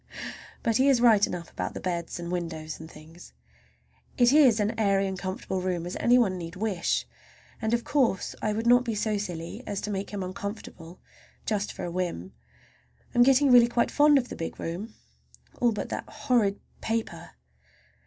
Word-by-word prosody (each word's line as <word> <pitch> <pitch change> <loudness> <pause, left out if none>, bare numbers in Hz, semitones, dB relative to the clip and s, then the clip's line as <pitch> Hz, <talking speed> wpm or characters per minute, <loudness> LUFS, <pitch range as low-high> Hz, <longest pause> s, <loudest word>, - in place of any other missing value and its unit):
But 230 -3 +2
he 270 +2 +4
is 265 -3 +4
right 225 -4 +5
enough 170 -1 -6
about - - -4
the - - -4
beds 175 -2 -3
and 170 0 -5
windows 165 -3 -4
and 160 0 -10
things. 160 +3 -14 0.8
It 245 +1 +5
is 265 -7 +6
as 210 +1 +1
airy 200 -3 +2
and 190 0 -3
comfortable 185 0 -3
a - - -4
room 180 -2 -2
as 175 - -5
any 245 +1 +5
one 195 -7 +2
need 165 +1 -7
wish, 195 -3 -1 0.6
and, 220 -1 -1
of 235 0 +1
course, 250 -10 +1
I 215 - 0
would 220 +2 -2
not 245 +1 +6
be 230 -3 -3
so 210 0 0
silly 175 +2 -6
as 200 -1 -2
to 210 - -4
make 195 0 -3
him 200 -2 -4
uncomfortable 185 -3 -7 0.5
just 210 -2 -1
for - - -8
a 175 - -4
whim. 170 - -3 0.8
I'm 240 - +4
really - - +8
getting 260 -3 +6
quite 240 -1 +1
fond 295 0 +5
of 250 -2 -1
the - - -6
big 165 - -6
room, 190 +7 -5 0.6
all 240 -1 +3
but 210 - -4
that - - -5
horrid 210 -6 +1 0.2
paper. 225 0 -3
205 Hz, 190 wpm, -27 LUFS, 180-235 Hz, 0.8 s, really